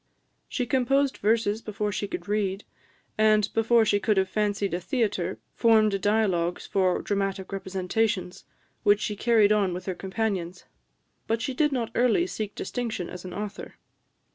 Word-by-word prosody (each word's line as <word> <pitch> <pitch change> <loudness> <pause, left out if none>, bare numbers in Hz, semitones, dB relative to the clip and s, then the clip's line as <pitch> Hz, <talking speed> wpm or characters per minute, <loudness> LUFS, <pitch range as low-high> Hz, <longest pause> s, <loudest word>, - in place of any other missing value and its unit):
She 250 - -1
composed 270 +2 +1
verses 220 0 +1
before 210 -1 -3
she 205 0 -3
could - - -6
read, 205 -1 -1 0.6
and, 215 -1 +4
before 225 0 +4
she 205 -1 +2
could 210 0 +1
have 190 0 +2
fancied 205 -2 0
a 175 - 0
theatre, 235 - -1 0.2
formed 215 -4 +3
dialogues 190 -5 +1
for 185 -2 +1
dramatic 195 -1 -2
representations, 190 +1 -2 0.4
which 205 0 +4
she 210 0 -2
carried 220 -1 +4
on 200 -4 +2
with 180 0 -7
her 190 - -2
companions. 190 -2 -3 0.6
But 225 0 0
she 265 +3 -3
did 295 +3 +2
not 235 -4 -2
early 250 +8 +3
seek 215 - -5
distinction 225 -4 -4
as 180 0 -8
an 180 - -7
author. 205 0 -6
210 Hz, 155 wpm, -26 LUFS, 195-225 Hz, 0.6 s, and